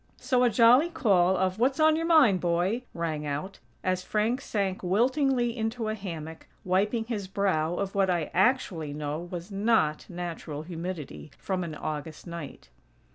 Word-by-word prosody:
So 250 -2 +1
a 245 - +5
jolly 240 +8 +5
call 190 - +3
of: 185 +2 0
"What's 265 +5 +2
on 310 0 +5
your 330 +1 -1
mind, 275 - +5
boy?" 180 +8 0
rang 160 -3 -3
out, 150 +7 -4 0.2
as 185 0 0
Frank 220 +7 0
sank 195 -6 -2
wiltingly 245 +5 +1
into 225 -1 -2
a - - -1
hammock, 165 -6 -7 0.2
wiping 205 +5 +1
his 220 -4 -4
brow 185 -4 0
of 195 +1 -3
what 195 -1 +2
I 170 -4 0
actually 180 - +1
know 150 +1 -3
was 175 +2 -7
not 195 -7 +1
natural 170 -4 -5
humidity 170 -3 -6
from 185 -2 -2
an 160 -3 -5
August 155 +1 -5
night! 170 - -8
190 Hz, 160 wpm, -28 LUFS, 170-230 Hz, 0.2 s, a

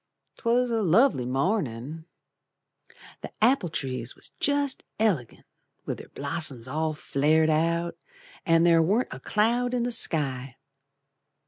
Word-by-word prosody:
'Twas 240 +1 +1
a 225 -1 +1
lovely 190 - +3
mornin'. 140 - -2 1.2
The - - -7
apple 225 -5 +3
trees 130 -5 -4
was - - -10
jest 285 -1 +1
elegant 185 - -1 0.4
With - - -4
their - - -11
blossoms 140 -4 -3
all 155 +3 -1
flared 155 +2 +2
out, 170 +2 0 0.5
An' 165 0 +4
there 170 -1 +5
warn't 205 +10 +1
a - - -8
cloud 240 +4 +1
in 240 - 0
the 245 - -1
sky. 135 - -1
165 Hz, 125 wpm, -26 LUFS, 140-225 Hz, 1.2 s, there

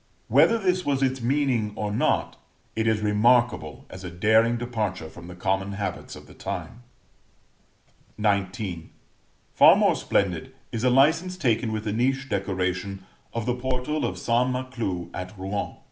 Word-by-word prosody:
Whether 230 - +5
this 185 -3 +1
was 140 -3 0
its 130 -1 0
meaning 120 -4 +1
or 105 -1 -2
not, 105 - 0 0.4
it 110 0 0
is 110 -1 +2
remarkable 105 - +2
as 90 +1 -9
a 90 - -5
daring 110 +6 +3
departure 105 -8 -3
from 85 +2 -12
the 90 - -9
common 95 +2 -1
habits 100 -2 -4
of - - -12
the - - -15
time. 120 - -6 1.4
XIX. 100 -4 -1 0.7
Far - - +8
more - - +3
splendid 100 +8 -1 0.2
is 115 -1 -3
a 130 - +4
license 160 +8 +3
taken 115 -6 +1
with 110 -1 -3
the 105 -2 -2
niche 135 +4 0
decoration 95 -1 -2 0.3
of 115 -2 -3
the 125 - +1
portal 130 +4 -2
of 120 - -2
St. 120 +2 +1
Maclou 125 -9 -3
at 90 +2 -7
Rouen. 95 +2 -3
110 Hz, 155 wpm, -25 LUFS, 95-125 Hz, 1.4 s, Far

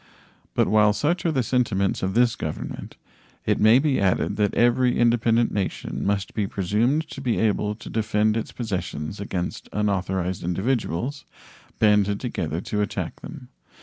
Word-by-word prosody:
But - - +3
while 105 -1 +4
such 160 - 0
are - - +2
the 130 -4 +1
sentiments 105 -5 0
of 95 +1 -2
this 120 -1 +4
Government, 80 -6 -6 0.5
it - - +1
may 110 +3 +6
be 135 0 +2
added 95 -2 +1
that 105 -1 +1
every 120 +1 +3
independent 120 0 +3
nation 100 -2 -3
must 100 -1 -1
be 105 -3 -1
presumed 115 - 0
to 135 - -7
be 125 -4 0
able 105 -1 +1
to 120 - -12
defend 110 -1 +1
its 115 - -3
possessions 95 -6 -4
against 100 +1 -4
unauthorized 95 -3 -1
individuals 115 - -2 0.5
banded 105 -1 +3
together 85 -9 -3
to 105 +1 -2
attack 105 - -4
them. - - -10
105 Hz, 150 wpm, -24 LUFS, 100-120 Hz, 0.5 s, may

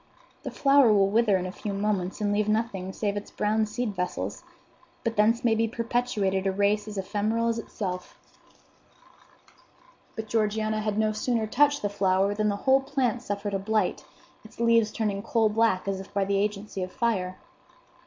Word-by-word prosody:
The - - -5
flower 275 -4 +4
will 195 -1 +3
wither 215 -3 +3
in 185 - -3
a 185 - -4
few 205 +1 -5
moments 195 -2 -1
and 205 -1 +1
leave 210 0 +1
nothing 215 -4 -1
save 205 0 -2
its 205 - -5
brown 215 +1 0
seed 215 -1 -3
vessels; 180 0 -3 0.6
but 230 -1 -1
thence 225 +4 +3
may 230 - +4
be 225 +1 +1
perpetuated 220 -5 -1
a - - +2
race 205 +2 +1
as 210 -1 -7
ephemeral 215 +4 0
as 230 0 -1
itself." 185 -5 -5 2.0
But 220 -1 -5
Georgiana 215 0 0
had 210 -1 -2
no 215 0 +2
sooner 225 +1 -1
touched 290 +5 +2
the - - +2
flower 195 0 +1
than 210 0 0
the 200 - 0
whole 270 0 +5
plant 265 -3 -1
suffered 205 -3 -4
a 195 - 0
blight, 210 -1 0 0.4
its 220 - -16
leaves 230 -2 +3
turning 205 -3 -2
coal 225 0 +2
black 210 -3 +1
as 195 -1 -1
if 195 - -10
by 200 -1 +2
the 195 0 +1
agency 205 -1 -3
of 185 0 -4
fire. 185 -6 -1
210 Hz, 180 wpm, -27 LUFS, 200-230 Hz, 2.0 s, whole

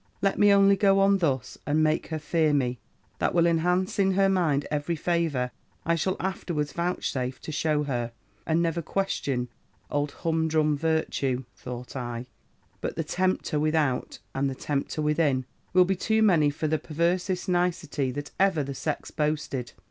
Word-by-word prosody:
Let 195 0 +1
me 205 0 +6
only 200 0 +6
go 195 -1 +4
on 195 0 +4
thus, 135 -7 -1
and 155 +2 +2
make 155 +1 +1
her 160 - -3
fear 155 0 +1
me: 125 -3 0 0.4
that - - 0
will 170 -1 +5
enhance 180 +3 +1
in 195 -1 +3
her 195 +1 +3
mind 160 -7 +2
every 150 +3 -1
favour 160 -7 0 0.3
I 170 - +2
shall 185 +3 0
afterwards 170 -6 -2
vouchsafe 135 -7 -2
to - - -7
shew 150 0 +1
her: 120 -4 -2 0.4
and 165 +1 +2
never 170 0 0
question 145 -8 -1 0.4
old 145 0 0
humdrum 160 -2 +2
Virtue,' 145 -4 0
thought 125 0 -8
I, 120 -1 -4 0.6
'but - - -3
the 165 - -1
tempter 180 -1 0
without, 155 -4 0 0.2
and 135 +1 0
the 135 - -4
tempter 145 +3 -2
within, 150 -4 +2 0.3
will 180 0 +6
be 190 +1 +1
too 220 +4 +1
many 165 -8 +5
for 145 +2 -2
the 155 0 +1
perversest 175 +4 -1
nicety 175 -6 0
that 145 +3 -5
ever 190 -6 +3
the 140 0 -5
sex 150 +3 -4
boasted.' 150 -4 -2
155 Hz, 165 wpm, -27 LUFS, 145-180 Hz, 0.6 s, me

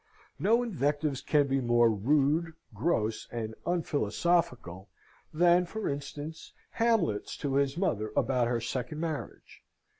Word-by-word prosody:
No 230 +3 +3
invectives 145 - -1
can 150 -2 +3
be 135 0 0
more 120 -1 +4
rude, 145 - +1 0.2
gross, 110 -10 -1
and 110 -2 -4
unphilosophical 140 - 0 0.4
than, 175 +2 +4
for 220 +5 -4
instance, 145 +3 -6 0.2
Hamlet's 220 - 0
to 140 -2 -2
his 140 +1 +1
mother 110 - -1
about 125 -3 +2
her 120 -1 0
second 125 +6 -4
marriage. 160 -2 -6
145 Hz, 120 wpm, -29 LUFS, 120-170 Hz, 0.4 s, more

